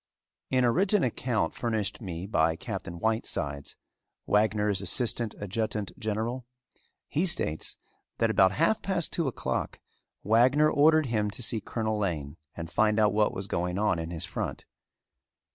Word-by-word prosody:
In 130 -1 +2
a 120 - +4
written 190 - +3
account 120 -7 0
furnished 110 -3 -2
me 90 -3 -5
by 80 -5 +2
Captain 85 +1 -6
Whitesides, 85 -9 -2 0.5
Wagner's 105 -2 +2
assistant 115 +3 0
adjutant 105 0 -2
general, 115 +4 -3 0.6
he 160 - 0
states 80 - 0 0.4
that 115 -1 +2
about 95 -3 +4
half 220 - +2
past 185 -4 -2
two 165 -4 0
o'clock 130 - -3 0.4
Wagner 130 +8 +4
ordered 155 +1 +5
him 110 -4 0
to 100 +5 -6
see 110 0 0
Colonel 110 0 -2
Lane 80 -6 -3 0.2
and 85 -1 -5
find 110 +2 +2
out 105 -2 +4
what 105 0 +3
was 95 - -4
going 90 -1 -2
on 100 -4 +1
in 80 0 -4
his 85 -2 -1
front. - - -4
110 Hz, 145 wpm, -28 LUFS, 95-120 Hz, 0.6 s, ordered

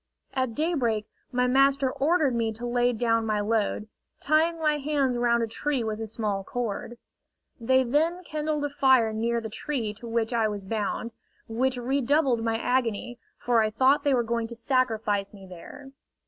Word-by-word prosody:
At 260 -4 -1
daybreak 255 -10 0 0.3
my 250 0 +1
master 270 +1 +3
ordered 300 -1 +2
me 230 -1 0
to 235 +3 -7
lay 245 0 +2
down 230 -1 +1
my 215 -1 0
load, 210 0 0 0.3
tying 320 +3 +2
my 305 -2 +1
hands 280 -3 0
round 235 -1 +2
a - - -1
tree 265 +3 -1
with 220 0 -3
a 225 - -4
small 210 -3 -2
cord. 240 +1 -4 0.6
They 260 +3 +3
then 320 +8 0
kindled 305 -2 -2
a - - -2
fire 260 -5 +3
near 235 +2 0
the 225 -1 -6
tree 225 -3 -3
to 225 +3 -11
which 230 0 -1
I 225 -2 +2
was 205 -2 -5
bound, 220 +2 -2 0.4
which 250 +3 0
redoubled 265 0 +1
my 225 -1 0
agony, 245 -1 -1 0.2
for 240 -2 +2
I 215 - +1
thought 265 +6 +3
they 285 -3 +3
were 240 - +2
going 230 0 -2
to 235 - -9
sacrifice 220 -5 0
me 195 -1 -12
there. 190 +10 -11
240 Hz, 175 wpm, -26 LUFS, 225-275 Hz, 0.6 s, master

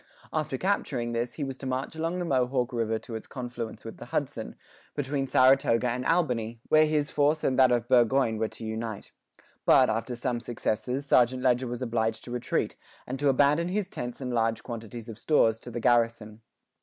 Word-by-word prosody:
After 155 -4 -1
capturing 130 -10 -1
this, 120 +1 -2
he 150 - -3
was 135 -1 -5
to 135 - -5
march 130 +4 -3
along 165 +3 -2
the 180 - -2
Mohawk 130 -3 0
river 115 -1 0
to 115 - -10
its 110 - -6
confluence 120 -3 -6
with - - -8
the - - -9
Hudson, - - -3 0.4
between 140 -1 -1
Saratoga 130 -2 +4
and 125 +2 -2
Albany, 120 -9 0
where 155 0 +6
his 150 -1 0
force 150 +2 +2
and 130 0 +1
that 130 -1 +6
of 120 -1 +1
Burgoyne 120 -2 +3
were 110 - +1
to 110 - -9
unite. 110 -1 -5 0.5
But, - - +5
after 115 +3 -2
some 120 0 -2
successes, 120 +3 -2
St. 125 -2 +4
Leger 125 0 +2
was 120 +1 -4
obliged 115 -2 -1
to 120 - -9
retreat, 125 -1 -1 0.3
and 130 +1 -5
to 145 -1 +3
abandon 145 +5 +3
his 195 +1 -2
tents 120 -7 -6
and 125 -1 -3
large 115 -1 0
quantities 115 0 -7
of 110 -2 -9
stores 115 -7 +3
to 125 - -10
the 120 0 -4
garrison. 115 -2 +1
125 Hz, 195 wpm, -28 LUFS, 115-135 Hz, 0.5 s, where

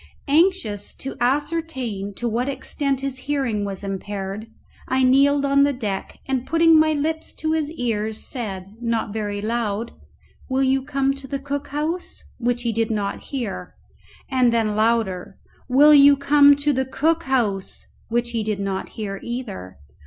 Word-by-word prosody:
Anxious 285 - +1
to 270 - -6
ascertain 260 -7 -1
to 240 - -3
what 240 +4 -1
extent 275 -1 -2
his 270 -1 -3
hearing 255 -8 0
was 195 0 -5
impaired, 195 +1 -5 0.4
I 260 0 +2
kneeled 280 +2 +4
on 280 0 +4
the 285 0 +4
deck, 210 -7 -4
and 265 -2 -1
putting 330 +2 +5
my 310 0 +4
lips 315 +2 -2
to 315 0 -2
his 315 -2 0
ear 220 -6 -1
said, 210 -3 -6
not 230 -3 -1
very 205 -2 -3
loud, 225 0 -2 0.6
"Will 265 +1 +1
you 265 0 +2
come 275 0 0
to 275 0 -9
the 275 - -2
cook 285 +1 -4
house?" 310 +5 -3 0.2
which 245 0 0
he 235 -2 0
did 225 +1 0
not 205 -3 -2
hear; 245 -8 -5 0.5
and 255 -3 +3
then 220 -2 +1
louder, 215 -5 0 0.3
"Will 290 +4 +7
you 285 -1 +8
come 285 +1 +6
to 285 +1 +1
the 265 0 0
cook 325 +5 +1
house?" 220 -8 -1 0.2
which 240 +1 0
he 230 -2 -1
did 210 -1 -2
not 195 -1 -3
hear 200 -3 -4
either. 215 - -6
250 Hz, 160 wpm, -22 LUFS, 215-280 Hz, 0.6 s, you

